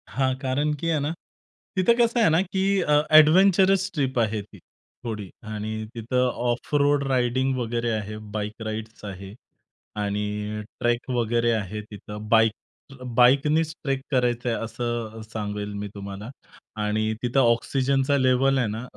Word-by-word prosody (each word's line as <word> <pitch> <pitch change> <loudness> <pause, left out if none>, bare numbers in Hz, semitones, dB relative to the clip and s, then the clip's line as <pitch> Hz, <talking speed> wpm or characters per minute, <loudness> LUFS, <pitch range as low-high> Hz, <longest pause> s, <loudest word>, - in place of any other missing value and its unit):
हां. 130 -1 0
कारण, 135 +3 0
की 160 +3 -3
आहे 160 -2 +1
ना, 145 +2 -1 0.7
तिथं 185 +5 +5
कसं 235 0 +3
आहे 220 - +5
ना, 160 +2 +3
की 190 0 -2 0.2
अ, 150 - +1 0.2
एडव्हेंचरस 190 +4 +5
ट्रिप 135 -6 0
आहे 110 -2 0
ती 100 0 -15 0.5
थोडी, 105 -4 -5
आणि 110 0 -4
तिथं 125 +3 0 0.2
ऑफ 120 +4 -3
रोड 145 0 +3
राइडिंग 130 0 +1
वगैरे 120 -1 -1
आहे. 105 -1 -3 0.2
बाईक 105 +1 -4
राइड्स 110 0 -6
आहे, 95 0 -8 0.7
आणि 105 +1 -3 0.2
ट्रेक 120 +2 0
वगैरे 120 0 +1
आहे 105 -1 -2
तिथं. 105 0 -9
बाईक 110 0 +5 0.7
बाईकनीच 150 +6 +4
ट्रेक 135 -2 -1
करायचं 125 -2 +1
आहे, 115 - 0
असं 115 -1 -4
सांगेल 105 -2 -5
मी 100 0 -4
तुम्हाला. 100 +2 -7 0.5
आणि 110 +1 0
तिथं 125 +2 +1
ऑक्सिजनचा 135 +3 +2
लेव्हल 130 +1 +3
आहे 125 -3 +1
ना, 110 +3 -4
120 Hz, 145 wpm, -25 LUFS, 110-135 Hz, 0.7 s, तिथं